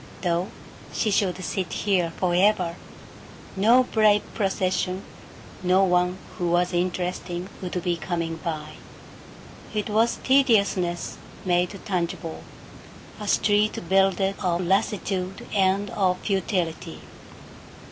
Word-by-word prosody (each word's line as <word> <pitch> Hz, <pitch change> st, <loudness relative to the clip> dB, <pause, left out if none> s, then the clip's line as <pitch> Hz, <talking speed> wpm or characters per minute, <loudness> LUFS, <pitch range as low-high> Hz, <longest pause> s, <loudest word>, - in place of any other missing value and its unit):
Though 175 Hz, +1 st, +1 dB, 0.4 s
she 215 Hz, -, 0 dB
should 195 Hz, -2 st, +1 dB
sit 185 Hz, -3 st, -3 dB
here 185 Hz, -5 st, +1 dB
forever, 180 Hz, -1 st, +2 dB, 0.8 s
no 230 Hz, +6 st, +5 dB
brave 215 Hz, -4 st, +3 dB
procession, 190 Hz, -2 st, -1 dB, 0.6 s
no 185 Hz, +1 st, +4 dB
one 180 Hz, 0 st, +2 dB, 0.2 s
who 175 Hz, -1 st, 0 dB
was 175 Hz, +1 st, +2 dB
interesting, 180 Hz, 0 st, -2 dB
would 180 Hz, -1 st, -3 dB
be 175 Hz, -1 st, 0 dB
coming 165 Hz, 0 st, -3 dB
by. 155 Hz, -3 st, -5 dB, 1.0 s
It 210 Hz, 0 st, -1 dB
was 225 Hz, +2 st, +2 dB
tediousness 200 Hz, -, +2 dB, 0.3 s
made 180 Hz, +2 st, +1 dB
tangible, 170 Hz, -3 st, -3 dB, 0.8 s
a 210 Hz, -, -6 dB
street 210 Hz, +1 st, +2 dB
builded 195 Hz, +1 st, +2 dB
of 180 Hz, -2 st, 0 dB
lassitude 190 Hz, 0 st, -1 dB
and 195 Hz, 0 st, +2 dB
of 185 Hz, -3 st, +1 dB
futility. 185 Hz, -5 st, -2 dB
185 Hz, 105 wpm, -25 LUFS, 175-200 Hz, 1.0 s, no